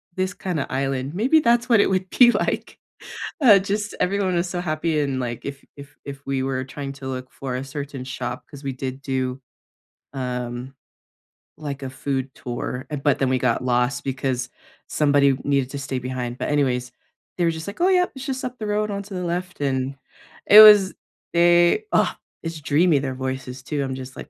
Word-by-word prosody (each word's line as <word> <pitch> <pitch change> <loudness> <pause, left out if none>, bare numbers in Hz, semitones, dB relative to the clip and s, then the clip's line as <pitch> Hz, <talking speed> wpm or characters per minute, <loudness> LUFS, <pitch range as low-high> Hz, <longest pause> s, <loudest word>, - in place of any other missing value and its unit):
this 185 +1 -1
kinda 180 -8 -3
island, 135 +1 -2
maybe 250 - +4
that's 240 -2 +2
what 230 -3 +6
it - - +4
would 190 -1 -1
be 240 +3 +6
like. - - -2 0.6
Uh, 215 -7 +8
just 205 +2 -3
everyone 190 -1 +1
was 175 +1 0
so 175 - -3
happy 155 -1 -1
and, 140 -3 -1
like, 120 -2 -4
if 140 0 -6
if 140 0 -12
if 140 0 -9
we 135 -1 -1
were 130 -1 -2
trying 135 +1 -6
to 135 -1 -8
look 130 -1 -5
for 130 -2 -5
a 130 - -3
certain 140 -1 -6
shop 130 0 -5
'cause 145 -1 -11
we 135 -1 -3
did 130 +1 -5
do, 130 -1 -2 0.8
um, 125 0 -4 0.8
like, 140 -2 -6
a 135 - -4
food 135 0 -3
tour, 125 +1 -5
uh, 150 - -2
but 145 0 +1
then 135 - +2
we 130 - +2
got 125 -2 +1
lost 125 0 +1
because 130 -2 -2 0.4
somebody 140 -2 +3
needed 140 -2 +1
to 140 - -6
stay 135 -2 -3
behind. 125 -1 -4
But, - - -3
anyways, 125 -4 0 0.5
they 175 - +2
were 165 - +3
just 160 +1 -7
like, 200 - -7
"Oh, 365 - +5
yep. 360 -1 +3
It's 265 0 -7
just 265 -2 -3
up 250 0 -5
the 215 - -4
road 210 0 0
onto 200 0 -5
the 180 - -3
left." 180 -1 -4
And 135 -1 -1 0.5
it 210 - +10
was 205 -3 +9 0.4
they, 175 - +4
uh, - - +3 0.3
it's 165 -1 -5
dreamy 145 +2 +3
their 130 -1 -3
voices 130 -1 -5
too. 145 0 -2
I'm 130 -1 -3
just 130 0 -8
like, - - -9
140 Hz, 200 wpm, -23 LUFS, 130-180 Hz, 0.8 s, it